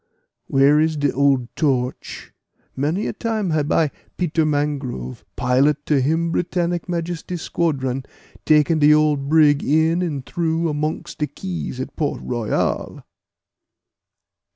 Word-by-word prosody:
Where 140 +2 +4
is 160 0 +1
de 145 -1 +1
old 135 -3 +1
Torch? 130 -5 -2 0.4
Many 155 +9 -1
a - - -2
time 220 -4 -2
hab 155 -1 0
I, 155 -3 +2 0.3
Peter 160 -3 +1
Mangrove, 140 - -2
pilot 135 +4 +2
to 145 -3 +2
Him 165 +5 +1
Britannic 175 0 -1
Majesty 175 0 -3
squadron, 135 -6 -2 0.4
taken 155 +1 +3
de 150 0 +6
old 150 -2 +1
brig 150 -2 +4
in 160 +4 +2
and 145 -7 -3
through 165 -1 -1
amongst 150 +1 -3
de 150 - 0
keys 175 -9 -6
at 130 +2 -6
Port 145 -3 -2
Royal!" 120 -3 -2
150 Hz, 130 wpm, -21 LUFS, 140-165 Hz, 0.4 s, de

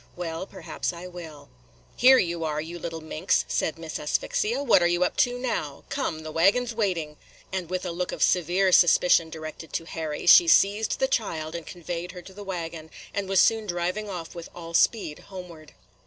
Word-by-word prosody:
"Well, 170 +1 -5
perhaps 175 -4 -4
I 170 +1 -9
will." 170 -5 -10 0.5
"Here 260 +1 +7
you 170 -5 0
are, 150 -1 -1
you 165 +3 -6
little 165 0 -5
minx," 160 +3 0
said 160 - -1
Miss 165 -1 -6
Asphyxia. 225 - -1
"What 240 -9 +5
you 175 +1 +2
up - - 0
to 245 0 +2
now? 230 - -3
Come, 160 -2 -3
the 155 - -6
waggin 195 +10 +3
's 240 - -5
waiting," 175 -9 -2 0.2
– - - -27
and, 185 -3 -3
with 185 0 -3
a 175 - -2
look 180 +1 -3
of - - -1
severe 180 +2 +2
suspicion 175 -1 +5
directed 160 0 -8
to 165 - -2
Harry, 160 -3 -5
she 345 - +8
seized 210 -8 +3
the - - +1
child 160 - -2
and 170 -2 -6
conveyed 175 0 -6
her 180 -1 -9
to 190 - -13
the 205 +2 -9
wagon, 165 -4 -6 0.2
and 200 -1 -3
was 195 -1 +3
soon 220 -1 +2
driving 180 +4 -2
off 175 -4 -6
with 170 -1 -8
all 170 -1 -9
speed 165 -4 +2
homeward. 170 -5 -10
175 Hz, 200 wpm, -26 LUFS, 160-195 Hz, 0.5 s, she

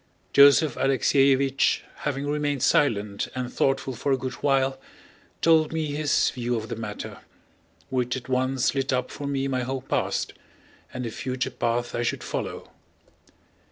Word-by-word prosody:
Joseph 140 +1 +7
Alexéevich, 135 +1 +3 0.2
having 140 -1 -3
remained 145 -2 -1
silent 105 -7 +2
and 125 -1 -4
thoughtful 135 -1 0
for 140 - -2
a 135 - +3
good 130 0 -4
while, 135 -1 +1 0.6
told 160 -2 +4
me 160 -2 -2
his 145 0 +1
view 120 -1 -2
of 110 -1 -4
the - - -3
matter, 105 -2 -6 0.7
which 125 0 0
at 125 -1 -9
once 130 0 +1
lit 135 0 -1
up 125 -1 -1
for 145 - -6
me 135 -1 -1
my 130 -2 -1
whole 130 +1 -3
past - - -1 0.6
and 125 -1 -5
the 115 - -4
future 130 +2 -3
path 120 +1 -1
I 120 - -1
should 120 - -2
follow. - - -5
135 Hz, 155 wpm, -25 LUFS, 125-140 Hz, 0.7 s, Joseph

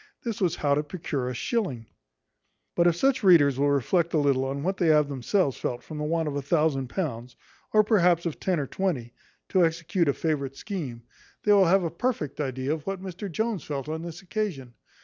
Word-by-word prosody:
This 230 -4 -4
was 180 -4 +2
how 145 -1 +1
to 145 - +2
procure 150 -5 -4
a 125 - -4
shilling; 140 - -2 0.9
but 175 0 +4
if 170 - +3
such 265 +8 +2
readers 150 - +5
will 145 +1 +3
reflect 165 +5 +1
a - - +4
little 140 -3 +2
on 140 +1 -3
what 190 +3 -1
they 175 - +1
have 150 -2 +5
themselves 140 - 0
felt 120 0 -3
from 155 -2 -7
the - - -2
want 165 +1 0
of 145 - -3
a 145 - -1
thousand 140 -2 +1
pounds, 125 -7 -4 0.4
or, 215 0 +5
perhaps, 180 -6 +3
of 165 - -3
ten 185 -4 0
or 140 - -1
twenty, 135 -8 -2 0.4
to 185 -2 +3
execute 165 +1 0
a - - +3
favourite 140 -4 -2
scheme, 140 - -6 0.4
they 210 - +5
will 195 -2 +6
have 190 +2 +4
a 165 - -2
perfect 220 - -2
idea 130 +1 -2
of 155 -2 -6
what 195 -1 -2
Mr 190 +1 -6
Jones 220 -2 -1
felt 140 -1 -4
on 160 +1 -3
this 170 +2 -8
occasion. 175 - -3
160 Hz, 210 wpm, -26 LUFS, 140-185 Hz, 0.9 s, will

